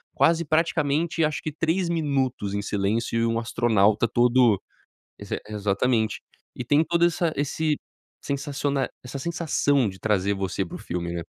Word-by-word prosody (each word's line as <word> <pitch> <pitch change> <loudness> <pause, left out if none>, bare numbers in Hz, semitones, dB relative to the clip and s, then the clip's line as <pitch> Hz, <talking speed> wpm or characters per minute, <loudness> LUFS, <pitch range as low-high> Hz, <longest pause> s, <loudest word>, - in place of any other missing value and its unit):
quase, 170 0 +3
praticamente, 160 +1 +1
acho 150 -1 0
que 155 - -3
3 165 +4 0
minutos 135 -10 -1
em 100 - -1
silêncio 105 +3 -1
e 115 - +2
um 115 0 0
astronauta 115 -2 +2
todo 120 -2 +4 0.6
Ex - - -10 0.2
exatamente. 105 +2 0 0.3
E, 125 - -4
tem 145 +4 +4
toda 170 +1 +2
essa 170 -1 -1
esse 150 +2 0 0.4
sensaciona 140 -1 -1 0.2
essa 125 +2 -6
sensação 145 -6 +1
de 95 0 -11
trazer 100 -2 +1
você 95 0 -2
para - - -9
o - - -8
filme, 85 0 -4
né? 85 -1 -4
130 Hz, 155 wpm, -25 LUFS, 105-155 Hz, 0.6 s, todo